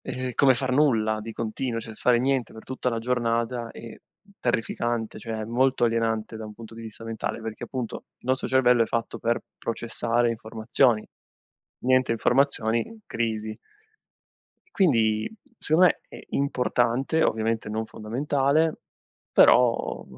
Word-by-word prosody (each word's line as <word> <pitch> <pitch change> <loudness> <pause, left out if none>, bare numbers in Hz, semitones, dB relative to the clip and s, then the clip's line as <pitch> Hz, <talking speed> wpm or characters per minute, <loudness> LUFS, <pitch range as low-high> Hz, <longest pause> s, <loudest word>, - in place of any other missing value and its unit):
e 130 0 -4
come 135 +1 +5
far 130 +1 -1
nulla 110 -6 +2
di 110 +1 -7
continuo, 115 +1 -3
cioè 110 0 -8
fare 120 +1 +3
niente 130 -2 0
per 110 - -10
tutta 130 -1 -2
la 115 -2 -1
giornata 120 0 -1
è 115 -1 -10 0.5
terrificante, 120 -1 -1
cioè 110 0 -4
molto 125 +3 +2
alienante 115 -1 0
da 110 - -7
un 105 - -10
punto 115 0 -11
di 115 - -9
vista 115 0 -9
mentale, 115 +1 -4
perché 110 -1 -5
appunto 125 -4 -5
il - - -17
nostro 130 0 +1
cervello 125 -2 +4
è 115 - 0
fatto 115 -1 -2
per 115 +1 +1 0.2
processare 120 +1 0
informazioni, 110 +1 +1 0.7
niente 130 -1 +3
informazioni: 125 - +1
crisi. 110 -2 -3 1.1
E - - -31
quindi, 115 - +2 0.3
secondo 170 +4 +5
me, - - 0
è - - -11
importante, 130 +2 +1
ovviamente 110 0 0
non 110 +1 -2
fondamentale, 140 +8 0 0.6
però 125 -2 +4
115 Hz, 140 wpm, -26 LUFS, 110-130 Hz, 1.1 s, come